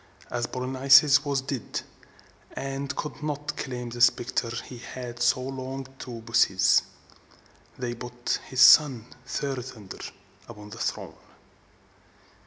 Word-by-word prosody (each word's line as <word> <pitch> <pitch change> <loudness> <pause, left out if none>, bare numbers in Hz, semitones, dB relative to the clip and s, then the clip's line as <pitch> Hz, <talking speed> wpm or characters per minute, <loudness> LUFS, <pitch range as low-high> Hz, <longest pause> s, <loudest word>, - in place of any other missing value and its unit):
As 120 -1 -2
Polynices 135 +2 +5
was 140 -3 -1
dead, 135 -3 -4 0.7
and 135 +1 -4
could 150 - -5
not 150 -1 -3
claim 125 -2 -5
the 120 +1 -6
scepter 120 0 +2 0.2
he 125 - -10
had 120 -1 -8
so 120 +1 +3
longed 130 0 -6
to 120 -2 -7
possess, 115 -5 +4 1.0
they 120 -1 -3
put 120 0 -3
his 130 -1 0
son 130 -6 +7 0.2
Ther 140 0 -2
san´der 120 -6 -8 0.4
upon 105 -2 -11
the - - -9
throne. - - -3
130 Hz, 120 wpm, -26 LUFS, 120-135 Hz, 1.0 s, son